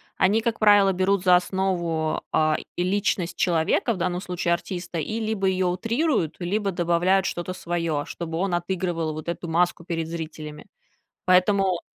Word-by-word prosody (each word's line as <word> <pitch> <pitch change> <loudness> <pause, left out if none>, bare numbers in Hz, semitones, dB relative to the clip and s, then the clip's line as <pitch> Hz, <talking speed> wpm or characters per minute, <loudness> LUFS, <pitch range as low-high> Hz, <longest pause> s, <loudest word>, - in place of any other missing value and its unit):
Они, 205 +4 +3
как 230 -1 -1
правило, 205 -2 +5
берут 190 +1 +1
за 180 -1 +6
основу, 175 -4 0
а, 155 0 +2 0.2
и 175 - 0
личность 185 -2 0
человека, 170 +6 +1
в 195 - -6
данном 180 0 -1
случае 175 -2 -1
артиста, 175 0 -4
и 215 +9 -3
либо 215 -3 -1
её 185 -1 +1
утрируют, 225 - 0
либо 200 +3 -1
добавляют 175 +2 +2
что-то 175 0 -3
своё, 170 -4 -2
чтобы 165 -1 -5
он 190 +1 -1
отыгрывал 175 -2 -1
вот 155 +2 -7
эту 170 0 -4
маску 170 +1 +1
перед 165 -2 -3
зрителями. 155 -2 -7 0.6
Поэтому 185 0 +3
180 Hz, 155 wpm, -24 LUFS, 170-195 Hz, 0.6 s, за